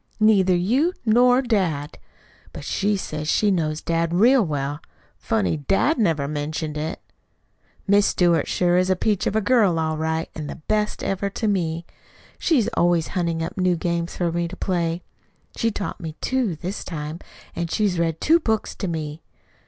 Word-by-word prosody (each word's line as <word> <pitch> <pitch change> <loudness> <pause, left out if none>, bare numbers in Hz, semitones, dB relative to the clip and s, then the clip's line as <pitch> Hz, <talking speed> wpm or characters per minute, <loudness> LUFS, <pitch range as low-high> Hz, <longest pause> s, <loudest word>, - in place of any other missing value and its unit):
Neither 200 -4 +4
you 250 - +2
nor 245 +3 +5
dad. 175 - -1 0.5
But - - -8
she 205 +1 0
says 155 -4 -5
she 205 +5 +3
knows 155 -4 -1
dad 165 0 0
real 240 +6 +5
well. 145 -3 -2 0.4
Funny 220 -8 0
dad 195 - +1
never 160 -9 +1
mentioned 150 +1 -3
it! 155 +1 -3 0.9
Miss 205 0 +4
Stewart 170 -4 +2
sure 175 0 +2
is 185 +1 +2
a 185 - +3
peach 205 +1 0
of - - -1
a 220 - +3
girl 205 -6 +3
all 160 -1 -1
right 160 +1 -1
and 150 -2 -6
the - - -5
best 210 +6 -2
ever 195 +1 -1
to 215 +3 -3
me. 170 -4 -1 0.5
She's 265 -10 +2
always 175 -6 +1
hunting 170 -2 -1
up 170 - -5
new 180 -1 +3
games 170 0 -2
for 175 -2 0
me 170 0 -1
to 185 +2 -9
play. 170 -2 -1 0.5
She's 230 -2 0
taught 200 - -5
me 160 -2 -6
two 255 -9 0
this 180 +6 -5
time, 155 -1 -5 0.4
and 170 -1 -2
she's 190 -1 0
read 165 -1 0
two 330 +2 +4
books 220 -8 -1
to 195 - -3
me. 155 -2 -4
175 Hz, 175 wpm, -23 LUFS, 160-210 Hz, 0.9 s, nor